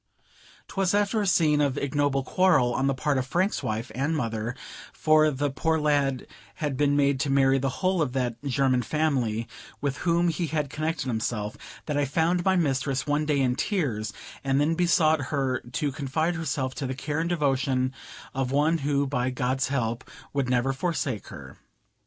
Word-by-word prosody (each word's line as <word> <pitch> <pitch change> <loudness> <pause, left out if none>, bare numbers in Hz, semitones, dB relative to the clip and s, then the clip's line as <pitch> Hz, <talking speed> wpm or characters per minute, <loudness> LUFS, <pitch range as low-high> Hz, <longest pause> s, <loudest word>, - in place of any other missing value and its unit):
'Twas 195 0 0
after 205 +1 +1
a 205 - -1
scene 150 -5 +3
of 140 -1 +1
ignoble 140 -1 0
quarrel 155 -8 +3
on 135 +2 +1
the 135 - +2
part 140 0 0
of 130 - -3
Frank's 185 - 0
wife 110 +1 -3
and 140 +7 0
mother 115 -2 -2 0.4
(for 155 0 +4
the 145 0 -1
poor 160 +3 0
lad 145 -3 +1 0.3
had 150 -3 -2
been 145 +1 +2
made 140 -1 +2
to 145 0 0
marry 135 0 +4
the 135 +1 0 0.2
whole 185 -2 +2
of 135 -5 -1
that 120 -3 -2
German 135 -2 +2
family 125 -5 0 0.3
with 140 -2 -2
whom 170 0 +2
he 165 +1 -1
had 150 -3 -2
connected 155 0 -2
himself), 110 -3 -2 0.3
that 150 -2 -2
I 145 - +2
found 165 +5 +1
my 190 +1 +3
mistress 135 -5 0
one 150 +1 0
day 145 -2 +2
in 125 -2 +2
tears, 130 - -1 0.3
and 135 0 +1
then 150 +3 +2
besought 160 -4 +3
her 135 -3 0
to 145 -1 0
confide 145 +5 -1
herself 140 -5 -2
to 135 - -1
the 130 - -3
care 145 +3 -3
and 165 +1 -1
devotion 135 -5 +1 0.4
of 130 -1 -1
one 150 +4 +2
who, 140 0 +1
by 130 -2 -1
God's 130 +1 -1
help, 120 -3 -2 0.2
would 140 -3 0
never 125 +2 +1
forsake 135 - -2
her. - - -11
140 Hz, 180 wpm, -26 LUFS, 130-155 Hz, 0.4 s, for